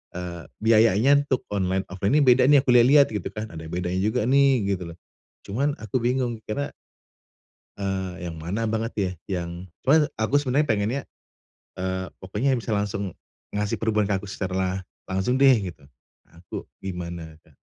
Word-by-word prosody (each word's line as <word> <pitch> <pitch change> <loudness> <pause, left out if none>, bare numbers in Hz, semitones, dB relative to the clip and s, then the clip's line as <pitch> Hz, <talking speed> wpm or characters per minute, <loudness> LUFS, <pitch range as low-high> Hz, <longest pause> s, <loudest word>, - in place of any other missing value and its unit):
eee, 90 -2 -6 0.2
biayanya 115 +5 +5
untuk 130 -3 -1
online, 95 -1 0
offline 100 +9 +1
ini 150 - +5
beda 125 0 +6
nih 145 -2 +7
aku 135 - -4
lihat-lihat 135 +4 +7
gitu 105 -4 -3
kan, 110 +1 -5
ada 80 0 -7
bedanya 90 +1 -2
juga 105 +1 +1
nih 135 -5 +4
gitu 90 -2 -7
loh. - - -20 0.5
Cuman 140 +9 0
aku 110 +3 -1
bingung, 125 -1 0
karena 140 +7 -3 1.1
Eee, 95 -3 -3
yang 80 - -9
mana 100 +8 -2
banget 115 +1 -1
ya, 100 -3 0 0.3
yang 85 +2 -7 0.2
pokoknya 150 +2 +5
aku 110 +5 -2
sebenarnya 145 +1 +1
pengennya, 110 +5 +1 0.7
eee, 95 0 -3 0.2
pokoknya 105 +8 0
bisa 120 -2 -3
langsung 100 -3 -2 0.3
ngasih 105 0 -2
perubahan 110 -2 +2
ke 100 -1 0
aku 105 - -9
secara 95 -1 -2 0.2
langsung 95 +8 0
deh, 135 -1 +8 0.2
gitu. - - -25 0.5
Aku 85 +1 -9 0.2
gimana, 85 -3 -5
Kak? - - -26
105 Hz, 160 wpm, -25 LUFS, 95-125 Hz, 1.1 s, deh